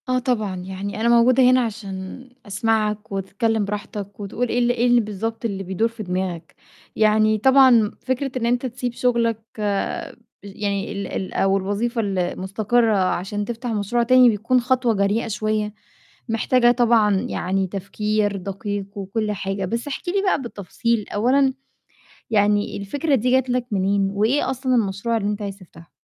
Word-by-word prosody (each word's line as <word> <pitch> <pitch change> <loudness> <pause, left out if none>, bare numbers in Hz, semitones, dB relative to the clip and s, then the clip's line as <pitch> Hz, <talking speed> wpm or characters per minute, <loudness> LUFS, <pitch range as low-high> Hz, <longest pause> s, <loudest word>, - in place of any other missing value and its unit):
آه 255 0 +2
طبعًا، 215 -6 -1
يعني 190 +3 -5
أنا 235 - +2
موجودة 240 +2 +5
هنا 255 0 +5
عشان 210 +1 -6 0.2
أسمعك 215 0 -1
وتتكلِّم 205 +3 -1
براحتك 205 0 -6
وتقول 210 +5 -2
إيه 245 - 0
ال 240 0 +3
إيه 245 0 +1
اللي 245 -1 +5
بالضبط 225 +2 -4
اللي 195 -3 -3
بيدور 190 +4 0
في 230 -1 -8
دماغك. 180 -3 -4 0.4
يعني 215 0 +3
طبعًا 265 +4 +6
م 225 -4 +4
فكرة 260 +1 -2
إن 235 - -1
أنت 245 +2 +1
تسيب 245 0 -4
شُغلك 235 -2 +1 0.2
بج 205 +1 -2 0.3
يعني 200 0 -3
ال 200 -1 -4
ال 190 - -5
أو 195 0 +2
الوظيفة 210 +5 -1
المستقرة 205 +4 0
عشان 195 +2 -1
تفتح 240 +2 -5
مشروع 225 +2 0
تاني، 255 +1 +6
بيكون 230 +4 +1
خطوة 250 -1 +1
جريئة 205 +3 0
شوية، 215 -1 -1 0.6
محتاجة 240 +2 +3
طبعًا 230 -4 +3
يعني 190 +1 -1
تفكير 205 +2 -1
دقيق 200 +1 -4
وكل 210 +2 -2
حاجة، 195 -1 -3
بس 230 +7 -3
احكِ 290 +5 -4
لي 390 +2 +1
بقى 375 -7 +1
بالتفصيل، 230 0 -2
أولًا 265 +5 +2 0.8
يعني 205 -1 +2
الفكرة 280 +9 0
دي 250 0 0
جات 260 0 +2
لك 250 0 0
منين، 195 0 +1
وإيه 220 +8 +1
أصلًا 260 0 0
المشروع 220 +1 0
اللي 205 -2 -2
أنت 210 0 -3
عايز 200 -1 -5
تفتحه؟ 170 -3 -16
215 Hz, 160 wpm, -22 LUFS, 200-240 Hz, 0.8 s, طبعًا